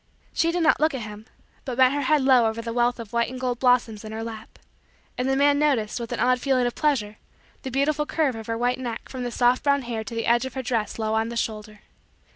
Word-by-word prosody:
She 330 - +2
did 345 0 0
not 315 - +4
look 310 -2 +2
at 245 - -4
him 210 +1 -9 0.4
but 255 -3 -5
bent 260 0 +5
her 290 - -1
head 285 +1 +2
low 255 -4 +5
over 220 +1 -3
the 230 0 -4
wealth 240 0 +1
of 230 -2 -9
white 235 0 +1
and 255 0 -7
gold 250 -2 -2
blossoms 245 -4 +2
in 215 - -8
her 220 +1 -5
lap; 225 -1 -9 0.6
and 255 +1 -1
the 270 - +2
man 285 +1 +3
noticed, 255 -8 +1
with 235 -1 -6
an - - -3
odd 250 0 +3
feeling 260 -3 +2
of 245 - -1
pleasure, 225 -9 0 0.4
the 265 - -5
beautiful 295 +3 0
curve 310 -5 +1
of 225 -1 -8
her 230 0 -2
white 245 +2 0
neck 240 -3 -5
from 255 -2 -5
the 245 - -2
soft 245 +1 +2
brown 280 -1 +2
hair 230 -2 -4
to 230 - -8
the 230 - -2
edge 235 +1 +3
of 260 - -6
her 260 - -3
dress 225 -5 -2
low 220 -1 -1
on 220 +1 0
the 235 - -5
shoulder. 215 -1 -4
245 Hz, 260 wpm, -24 LUFS, 225-265 Hz, 0.6 s, bent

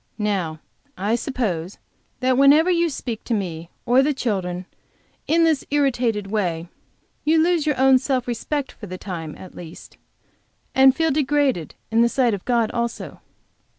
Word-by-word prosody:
Now, 190 -7 -2 0.4
I 205 +4 -1
suppose 210 - -2 0.4
that 255 0 +2
whenever 290 +6 +5
you 340 -1 +2
speak 240 -6 -5
to 235 - 0
me 170 -5 -4 0.2
or 250 +2 +5
the 290 +1 +1
children 185 -7 -2 0.6
in 330 +1 +3
this 320 -4 +2
irritated 245 -7 +1
way 175 -6 -1 0.5
you 315 +2 +3
lose 330 -1 +2
your 290 -4 0
own 265 -1 +6
self 260 -2 -1
respect, 270 +4 -3
for 210 - -11
the 185 0 -6
time, 165 -5 -6
at 185 - -12
least, 165 -2 -11 0.8
and 265 0 +6
feel 325 -1 +1
degraded 275 - 0 0.2
in 225 +1 +3
the 235 - +4
sight 245 -3 +2
of 195 - -4
God 235 -3 +1
also." 235 0 -4
240 Hz, 155 wpm, -22 LUFS, 195-275 Hz, 0.8 s, own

